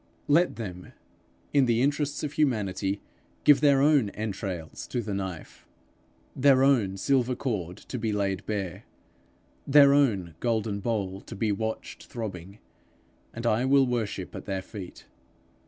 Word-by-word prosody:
Let 165 +5 +3
them, 90 -5 -7 0.6
in 140 -2 +5
the 120 +1 +2
interests 145 +1 0
of 150 -1 -3
humanity, 100 -9 0 0.4
give 145 -1 +6
their 140 -2 +5
own 145 -8 +4
entrails 95 -6 -5
to 125 - -2
the 105 -3 -3
knife, 95 -4 -6 0.7
their 135 -1 +5
own 115 -9 +3
silver 130 +3 +1
cord 95 - -3
to 125 - -7
be 110 -1 -1
laid 100 -2 -1
bare, 100 -5 -4 0.8
their 140 0 +7
own 105 - +2
golden 110 -3 -1
bowl 100 -3 -2
to - - -10
be 110 +1 0
watched 110 +2 -4
throbbing, 100 -4 -7 0.7
and 115 +1 -7
I 115 +1 +2
will 135 0 +5
worship 120 -4 -3
at - - -7
their 95 -1 -3
feet. 95 -4 -10
110 Hz, 140 wpm, -27 LUFS, 95-135 Hz, 0.8 s, their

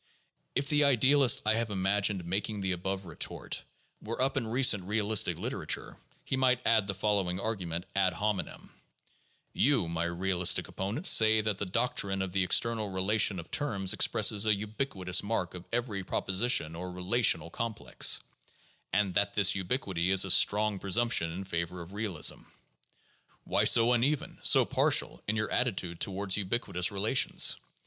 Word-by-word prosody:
If 140 +1 -1
the 150 0 +3
idealist 135 -1 +4
I 110 - +3
have 115 0 -2
imagined 100 -1 -1
making 100 +4 -3
the 95 -1 -2
above 95 +2 -4
retort 85 - -3 0.4
were 115 +2 -6
up 135 +1 +1
in 125 -5 -2
recent 115 -5 +3
realistic 105 +1 +1
literature, - - -4 0.3
he - - -2
might 130 -1 +1
add 110 -3 +2
the 100 - -2
following 95 -2 -1
argument 90 -5 -4
ad 95 -2 +1
hominem: 105 +1 -4 0.8
"You, 135 - +1
my 85 0 -3
realistic 90 +1 0
opponent, 105 - -5
say 110 - +5
that 105 -2 -2
the 100 - -3
doctrine 100 -2 0
of 95 - -6
the 95 +1 0
external 110 +3 0
relation 95 +1 +1
of 85 - -10
terms 100 -10 0
expresses 105 +1 +2
a 110 - +4
ubiquitous 100 -3 -1
mark 100 -4 -3
of 90 0 -10
every 115 -5 -3
proposition 95 -4 0
or 90 +2 -7
relational 90 -3 0
complex, 115 0 0 0.7
and 100 -3 0
that 100 +2 0
this 100 -1 +5
ubiquity 95 -3 -2
is 95 0 +4
a 95 - 0
strong 105 +1 +3
presumption 100 -3 0
in 90 +4 -6
favor 85 -1 -5
of 85 +3 -11
realism. 100 -6 -1 1.0
Why - - 0
so 120 +1 +5
uneven, 150 +8 -1
so 130 -3 +5
partial, 135 +3 +1
in 105 - -1
your 110 -1 -3
attitude 95 -9 -2
toward 95 0 0
ubiquitous 100 -2 -1
relations? 105 +6 +2
100 Hz, 155 wpm, -29 LUFS, 95-115 Hz, 1.0 s, say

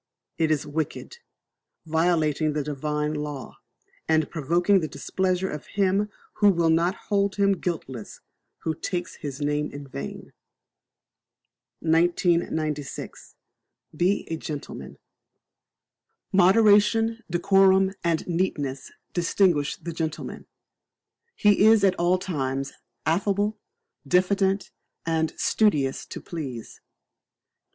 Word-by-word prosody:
It 160 -1 +2
is 155 -2 +1
wicked, 155 - -4 0.7
violating 160 -2 +1
the 150 -1 -1
Divine 150 +1 -2
law, 150 -3 -6 0.5
and 160 -1 +2
provoking 175 +6 +2
the 160 - -2
displeasure 185 +6 -1
of 150 -1 -7
Him 200 +1 +2 0.3
who 205 - +5
will 170 -3 +3
not 170 +4 +2
hold 200 -1 +1
him 200 -1 +3
guiltless 130 - -5 0.4
who 160 - 0
takes 175 +3 -4
His 140 -3 -6
name 150 +1 0
in 145 0 -8
vain. 70 - -7 1.5
1996. 160 -3 0 0.6
Be 180 +5 +1
a 165 - -1
Gentleman. 150 -2 -7 1.4
Moderation, 210 +4 +4
decorum, 190 +2 +4
and 165 -2 0
neatness 145 -7 -2 0.2
distinguish 170 -4 +2
the 170 - -7
gentleman; 160 -1 -5 0.9
he 205 -1 +4
is 220 -2 +6
at 195 -2 +5
all 175 +2 +3
times 135 -7 -3 0.3
affable, 205 +5 0 0.5
diffident, 190 +3 +2 0.3
and 160 -1 0
studious 145 -12 +1
to - - -7
please. 135 -9 -7
170 Hz, 100 wpm, -25 LUFS, 150-190 Hz, 1.5 s, is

